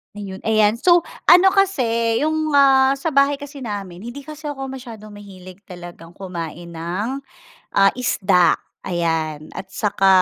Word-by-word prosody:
Ayun 195 -2 -7
ayan, 215 0 +3
so, 345 +5 +4 0.2
ano 360 +2 +7
kasi, 235 - +1
yung 310 0 0
ah, 270 -1 +5
sa 275 +4 -3
bahay 280 0 +3
kasi 280 -2 -8
namin, 195 -5 -6
hindi 240 +8 -8
kasi 305 +1 -11
ako 270 -2 -5
masyadong 235 -5 -9
mahilig 190 -3 -12
talagang 175 -2 -11
kumain 170 -2 -7
ng, 180 +10 -4 0.6
ah, 195 0 +5
isda, 190 -7 +2 0.3
ayan, 160 -3 -2
at 190 0 -8
saka 195 -1 0
215 Hz, 140 wpm, -20 LUFS, 185-275 Hz, 0.6 s, ano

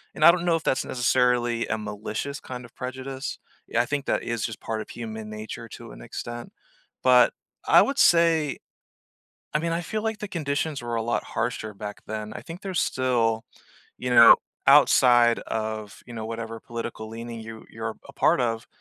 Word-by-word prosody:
and 155 - -1
I 170 - +11
don't 175 0 -2
know 170 - +3
if 165 - -3
that's 130 - +1
necessarily 125 -1 +1
a 110 - -1
malicious 110 +6 -5
kind 125 -1 -8
of 120 - -17
prejudice. 130 +2 -5 0.3
Yeah, 120 - +2
I - - -1
think 140 +1 -2
that - - 0
is 115 -2 -2
just 110 -2 -5
part 110 -1 -3
of - - -9
human 110 -2 -7
nature 110 +2 -7
to - - -10
an - - -12
extent. 120 - -7 0.5
But, - - +6 0.3
I - - +8
would 275 0 -2
say, 165 -4 +4 1.0
I - - +4
mean, 165 +2 -1
I 165 - 0
feel 215 +5 -3
like 220 -1 -2
the 210 - -5
conditions 150 -3 -2
were 120 0 -3
a 115 - 0
lot 120 +1 -1
harsher 110 -2 -3
back 105 +1 -7
then. 110 0 -5
I - - -7
think 170 +2 -9
there's 190 -3 -1
still, 115 -3 +1 0.5
you 125 0 -3
know, 115 -1 +9 0.3
outside 120 -2 +6
of, 110 -1 -4
you 120 - -10
know, 110 -1 -5
whatever 115 0 -5
political 115 -2 -6
leaning 115 +1 -7
you 110 0 -9
you're 110 0 -5
a - - -10
part - - +3
of, 115 -1 -1
120 Hz, 190 wpm, -25 LUFS, 110-140 Hz, 1.0 s, I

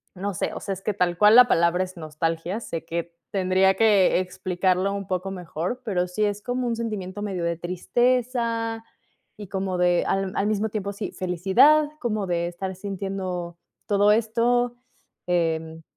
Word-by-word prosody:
no 200 +2 -3
sé, - - -2
o - - -5
sea, 195 - -4
es 190 - -8
que 210 - -1
tal 180 -3 0
cual 210 +3 +6
la 250 0 +9
palabra 170 +2 +3
es 185 -1 -9
nostalgia. 165 +4 -3
Sé 165 -7 -5
que 170 0 -4 0.2
tendría 190 0 +3
que 205 -4 +4
explicarlo 185 +1 0
un 200 0 -4
poco 185 +1 -2
mejor, 180 +5 -4
pero 180 -5 0
sí 180 +4 -2
es 205 0 -2
como 250 +2 -2
un 235 - 0
sentimiento 205 -4 -4
medio 190 -4 -3
de 170 -1 -1
tristeza 230 +5 0 0.5
y 205 -3 -9
como 190 -1 -2
de 175 -1 +2
al 195 -1 0
al 200 - +1
mismo 215 +1 0
tiempo 200 -1 -4
sí, 200 +1 -5
felicidad, 195 - +4
como 215 -6 -1
de 170 -1 0
estar 185 +2 -5
sintiendo 185 -3 -4 0.3
todo 205 0 +4
esto, 235 +2 +1 0.5
em, 160 -2 -1
190 Hz, 170 wpm, -24 LUFS, 180-215 Hz, 0.5 s, la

